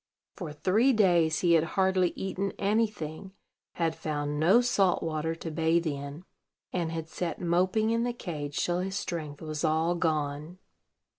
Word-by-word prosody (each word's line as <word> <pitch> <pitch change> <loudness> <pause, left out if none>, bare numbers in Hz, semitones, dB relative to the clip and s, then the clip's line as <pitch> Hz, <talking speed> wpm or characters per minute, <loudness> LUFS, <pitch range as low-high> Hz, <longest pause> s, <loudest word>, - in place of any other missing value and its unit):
For 170 -6 -6
three 200 - +3
days 175 -7 +3
he 175 -2 +4
had 160 -2 +5
hardly 190 -1 +3
eaten 195 +1 -3
any 215 +3 +2
thing, 190 -1 -8 0.4
had 165 -2 0
found 150 -2 -3
no 185 +9 +6
salt 200 -7 +2
water 160 0 -2
to 165 0 -6
bathe 165 +2 +1
in, 145 +2 -5 0.5
and 170 -3 -1
had 160 -1 -4
sat 170 +1 -4
moping 185 +6 +2
in 230 0 +1
the 245 - 0
cage 150 -10 -5
till 175 0 0
his 190 +1 -3
strength 160 -7 -4
was 155 0 -4
all 160 +2 +2
gone. 155 0 -2
170 Hz, 160 wpm, -29 LUFS, 155-190 Hz, 0.5 s, no